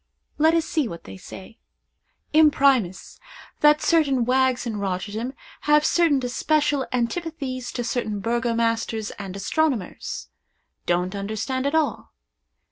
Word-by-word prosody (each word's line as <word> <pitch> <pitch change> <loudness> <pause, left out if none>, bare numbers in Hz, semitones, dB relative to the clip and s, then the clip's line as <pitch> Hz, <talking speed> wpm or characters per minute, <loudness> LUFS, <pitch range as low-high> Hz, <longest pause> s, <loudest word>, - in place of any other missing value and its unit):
Let 320 +2 +5
us 330 -1 +2
see 310 -6 0
what 170 -5 -8
they 95 - -10
say: 190 - -11 0.7
Imprimus. 275 - +3 0.4
That 300 0 +5
certain 280 -7 +3
wags 255 0 +2
in 225 -3 -3
Rotterdam 205 +5 -3 0.4
have 300 0 +5
certain 330 -5 +3
especial 290 +2 +1
antipathies 255 0 -3
to 245 - -2
certain 225 -4 -2
burgomasters 230 -1 -1
and 195 -2 -6
astronomers. 215 - -2 0.6
Don't 180 +2 +1
understand 220 +7 -2
at 285 - 0
all. 315 -2 -1
245 Hz, 120 wpm, -24 LUFS, 215-295 Hz, 0.7 s, Let